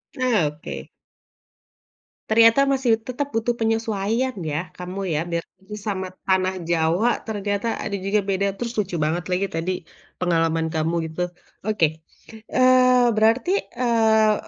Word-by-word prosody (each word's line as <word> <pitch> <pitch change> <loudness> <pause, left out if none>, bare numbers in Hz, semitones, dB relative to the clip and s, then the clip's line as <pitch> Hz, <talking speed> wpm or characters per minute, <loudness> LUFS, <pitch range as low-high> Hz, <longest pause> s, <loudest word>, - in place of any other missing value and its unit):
Nah 240 - +2
oke. 70 - -7 1.4
Ternyata 230 +5 +6
masih 255 -5 +2
tetap 255 +5 -4
butuh 225 +1 0
penyesuaian 225 +2 0
ya 155 +3 -3
kamu 180 +2 -6
ya, - - +1
biarpun 170 +3 -5
sesama 195 -3 -4 0.2
tanah 185 0 +1
Jawa 170 +7 +2
ternyata 205 +1 -2
ada 200 -2 -3
juga 195 +2 0
beda, 195 0 0
terus 235 -1 -4
lucu 190 -5 -1
banget 160 +3 0
lagi 190 +2 +1
tadi, 165 +2 -2 0.5
pengalaman 165 -2 +1
kamu 160 +1 -1
gitu. 175 +2 -3 0.3
Oke, 160 -7 0 0.5
eee, 255 -1 +5
berarti, 225 +11 +3 0.3
eee, 220 -3 +4
200 Hz, 125 wpm, -23 LUFS, 175-230 Hz, 1.4 s, Ternyata